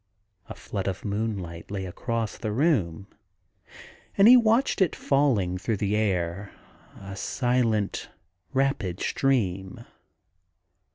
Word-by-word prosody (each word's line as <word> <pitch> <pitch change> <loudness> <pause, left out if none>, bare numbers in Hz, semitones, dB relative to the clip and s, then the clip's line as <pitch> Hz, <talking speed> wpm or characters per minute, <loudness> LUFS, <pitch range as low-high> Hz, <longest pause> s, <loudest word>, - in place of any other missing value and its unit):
A - - -7
flood 100 -2 -5
of 95 +1 -4
moonlight 100 -5 -3
lay 100 -2 -4
across 115 +4 -3
the 110 - -4
room, 105 - +1 1.1
and 200 +1 +7
he 250 - +10
watched 230 -1 +3
it 185 - +2
falling 115 -11 +1
through 105 +3 -1
the 100 +1 0
air, 95 -2 -1 0.5
a 100 0 -8
silent, 115 -2 0 0.4
rapid 135 -10 0
stream. 95 -9 -1
105 Hz, 110 wpm, -26 LUFS, 95-130 Hz, 1.1 s, he